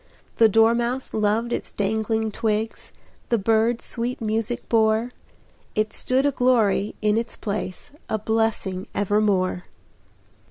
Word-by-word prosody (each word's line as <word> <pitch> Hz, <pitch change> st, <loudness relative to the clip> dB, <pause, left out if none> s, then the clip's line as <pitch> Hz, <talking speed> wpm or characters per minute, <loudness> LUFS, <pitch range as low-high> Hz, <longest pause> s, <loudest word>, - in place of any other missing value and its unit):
The 225 Hz, -1 st, +6 dB
dormouse 235 Hz, +4 st, +2 dB
loved 220 Hz, +3 st, +1 dB
its -, -, -4 dB
dangling 220 Hz, +2 st, -1 dB
twigs, 220 Hz, +1 st, -2 dB, 0.4 s
The 235 Hz, -, +3 dB
birds 225 Hz, +3 st, +1 dB
sweet 240 Hz, +1 st, -3 dB
music 225 Hz, +1 st, -2 dB
bore 220 Hz, +1 st, +2 dB, 0.6 s
It 215 Hz, 0 st, 0 dB
stood 260 Hz, +2 st, +1 dB
a 285 Hz, -, +3 dB
glory 225 Hz, -6 st, +2 dB
in 210 Hz, +1 st, +3 dB
its 230 Hz, -, -5 dB
place, 200 Hz, 0 st, -5 dB, 0.2 s
A 220 Hz, -, 0 dB
blessing 215 Hz, -3 st, -1 dB
evermore. 200 Hz, -3 st, +1 dB
220 Hz, 120 wpm, -23 LUFS, 210-230 Hz, 0.6 s, The